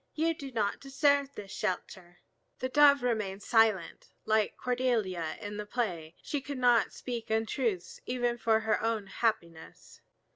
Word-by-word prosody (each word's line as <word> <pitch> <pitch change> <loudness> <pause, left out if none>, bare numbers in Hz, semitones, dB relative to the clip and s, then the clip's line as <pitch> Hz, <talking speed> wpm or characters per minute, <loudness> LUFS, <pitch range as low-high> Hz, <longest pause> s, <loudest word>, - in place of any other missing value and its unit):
You 330 +1 +1
do 275 -4 -8
not 210 -4 -1
deserve 280 0 +1
this 200 -2 -8
shelter." 175 -1 -4 0.4
The 255 - -3
Dove 280 -1 +6
remained 210 -5 -1
silent. 220 -7 +2 0.2
Like 215 -1 +1
Cordelia 225 -10 -1
in 205 0 -6
the 210 0 -5
play, 175 -9 -3
she 290 - -3
could 285 0 -6
not 245 -2 +3
speak 235 -3 -6
untruths 220 -3 -1
even 245 -1 -1
for 225 -1 +2
her 220 -1 0
own 225 -2 -1
happiness. 175 -7 -3
225 Hz, 145 wpm, -30 LUFS, 200-255 Hz, 0.4 s, Dove